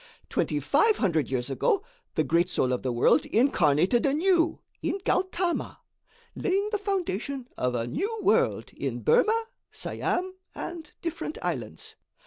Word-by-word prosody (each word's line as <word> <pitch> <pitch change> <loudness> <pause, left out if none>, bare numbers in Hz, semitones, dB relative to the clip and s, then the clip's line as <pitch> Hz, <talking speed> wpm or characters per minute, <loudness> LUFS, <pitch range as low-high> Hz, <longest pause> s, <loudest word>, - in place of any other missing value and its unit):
Twenty - - 0
five 440 -1 +3
hundred 165 - +1
years 130 0 -1
ago, 400 - +1 0.3
the 155 - +2
Great 170 +3 +2
Soul 130 -7 +1
of 125 - -1
the 130 - -1
World 120 +6 +4
incarnated 190 - +3
anew 330 +4 +2 0.2
in - - -1
Gautama, 365 -1 0 0.5
laying 400 +1 0
the 420 - 0
foundation 280 - -2
of 125 -1 -1
a 115 -1 -1
new 405 - -2
world - - +2
in - - -3
Burmah, 455 -1 +3 0.2
Siam 370 +1 -2 0.2
and 330 -3 -6
different 325 -2 -4
islands. 120 - -4
280 Hz, 135 wpm, -27 LUFS, -, 0.5 s, World